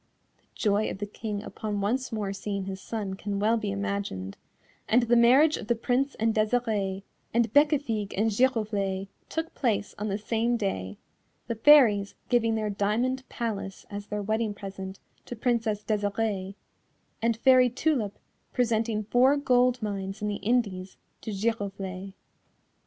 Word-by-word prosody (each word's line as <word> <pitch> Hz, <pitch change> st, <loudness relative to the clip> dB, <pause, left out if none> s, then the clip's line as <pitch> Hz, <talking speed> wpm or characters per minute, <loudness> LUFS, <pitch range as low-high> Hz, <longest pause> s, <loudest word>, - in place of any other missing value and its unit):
The -, -, -36 dB
joy 210 Hz, 0 st, +1 dB
of -, -, -5 dB
the 205 Hz, -, -3 dB
King 205 Hz, 0 st, -5 dB
upon 210 Hz, -2 st, -4 dB
once 250 Hz, +7 st, -1 dB
more 210 Hz, -3 st, -2 dB
seeing 200 Hz, 0 st, -4 dB
his 190 Hz, -1 st, -6 dB
son 205 Hz, -3 st, -4 dB
can 200 Hz, +1 st, -4 dB
well 215 Hz, +3 st, +3 dB
be 215 Hz, -3 st, -2 dB
imagined, 200 Hz, -, -3 dB, 0.5 s
and 240 Hz, +2 st, +5 dB
the 240 Hz, 0 st, +3 dB
marriage 260 Hz, +7 st, +6 dB
of -, -, -8 dB
the 235 Hz, -, +2 dB
Prince 255 Hz, +4 st, 0 dB
and 225 Hz, 0 st, +1 dB
Desirée, 215 Hz, -4 st, 0 dB, 0.3 s
and 235 Hz, -2 st, +2 dB
Bécafigue 285 Hz, -9 st, +2 dB
and 220 Hz, +2 st, +2 dB
Giroflée 205 Hz, -5 st, 0 dB, 0.2 s
took 320 Hz, +1 st, -3 dB
place 215 Hz, -6 st, -1 dB
on 210 Hz, -, -2 dB
the 200 Hz, -1 st, -1 dB
same 230 Hz, +3 st, 0 dB
day, 100 Hz, -, -3 dB, 0.5 s
the 235 Hz, -, -2 dB
Fairies 225 Hz, -5 st, +5 dB
giving 230 Hz, -2 st, +2 dB
their 215 Hz, -1 st, -1 dB
diamond 240 Hz, +6 st, -1 dB
palace 210 Hz, -5 st, -4 dB
as 205 Hz, 0 st, -6 dB
their 210 Hz, 0 st, -3 dB
wedding 215 Hz, 0 st, -1 dB
present 195 Hz, -1 st, -7 dB, 0.3 s
to 245 Hz, -, -5 dB
Princess 225 Hz, -3 st, 0 dB
Desirée, 205 Hz, -2 st, -1 dB, 0.7 s
and 230 Hz, 0 st, +1 dB
Fairy 255 Hz, +1 st, +6 dB
Tulip 245 Hz, -5 st, 0 dB, 0.4 s
presenting 225 Hz, -3 st, +1 dB
four 255 Hz, +6 st, +4 dB
gold 250 Hz, -3 st, +2 dB
mines 195 Hz, -1 st, -3 dB
in 210 Hz, -, -2 dB
the 205 Hz, -1 st, -2 dB
Indies 200 Hz, -4 st, -1 dB, 0.2 s
to -, -, -6 dB
Giroflée. 195 Hz, -3 st, -3 dB
215 Hz, 150 wpm, -27 LUFS, 200-235 Hz, 0.7 s, marriage